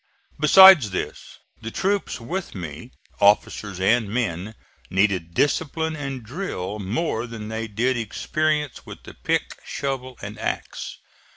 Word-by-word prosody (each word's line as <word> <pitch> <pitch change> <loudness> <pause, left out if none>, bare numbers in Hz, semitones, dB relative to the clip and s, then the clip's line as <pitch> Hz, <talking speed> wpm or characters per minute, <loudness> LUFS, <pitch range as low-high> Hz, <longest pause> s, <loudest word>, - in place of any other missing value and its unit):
Besides 170 - +9
this, 95 - -5 0.2
the 115 - -5
troops 195 - -1
with 170 - -5
me, 85 - -7 0.3
officers 100 -1 +2
and 110 +3 +2
men, 105 -2 -2 0.3
needed 95 -4 +1
discipline 160 +2 0
and 135 -4 -5
drill 110 - -5
more 115 - -2
than 110 -2 -7
they 110 0 -3
did 120 +5 0
experience 150 +5 -1
with - - -11
the - - -11
pick, - - -2
shovel 130 -2 -4
and 100 +2 -7
axe. - - -4
115 Hz, 125 wpm, -23 LUFS, 100-145 Hz, 0.3 s, Besides